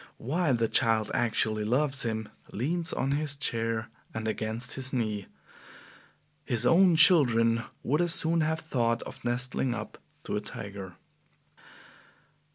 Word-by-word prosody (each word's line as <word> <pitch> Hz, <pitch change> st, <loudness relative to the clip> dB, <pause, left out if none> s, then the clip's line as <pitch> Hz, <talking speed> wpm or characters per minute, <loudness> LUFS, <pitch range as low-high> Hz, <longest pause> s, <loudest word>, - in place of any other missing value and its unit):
Why, 155 Hz, +5 st, -1 dB
the 115 Hz, -2 st, +1 dB
child 110 Hz, -2 st, +2 dB
actually 110 Hz, -2 st, +1 dB
loves 135 Hz, +5 st, +2 dB
him 110 Hz, -2 st, -3 dB, 0.2 s
leans 165 Hz, -, -1 dB
on 135 Hz, -, -1 dB
his 145 Hz, 0 st, 0 dB
chair 115 Hz, -4 st, -2 dB, 0.3 s
and 110 Hz, 0 st, -3 dB
against 110 Hz, +3 st, -2 dB
his 130 Hz, -1 st, -2 dB
knee. 110 Hz, -6 st, -2 dB, 1.2 s
His 120 Hz, 0 st, -1 dB
own 175 Hz, +4 st, +5 dB
children 115 Hz, -, +5 dB, 0.2 s
would 150 Hz, +6 st, +1 dB
as 175 Hz, -1 st, +3 dB
soon 165 Hz, +1 st, +2 dB
have 160 Hz, +1 st, -1 dB
thought 120 Hz, -6 st, -1 dB
of -, -, -11 dB
nestling 125 Hz, +1 st, -1 dB
up 105 Hz, 0 st, -8 dB, 0.2 s
to -, -, -4 dB
a 105 Hz, -, -1 dB
tiger." 100 Hz, -4 st, -8 dB
120 Hz, 135 wpm, -28 LUFS, 110-145 Hz, 1.2 s, own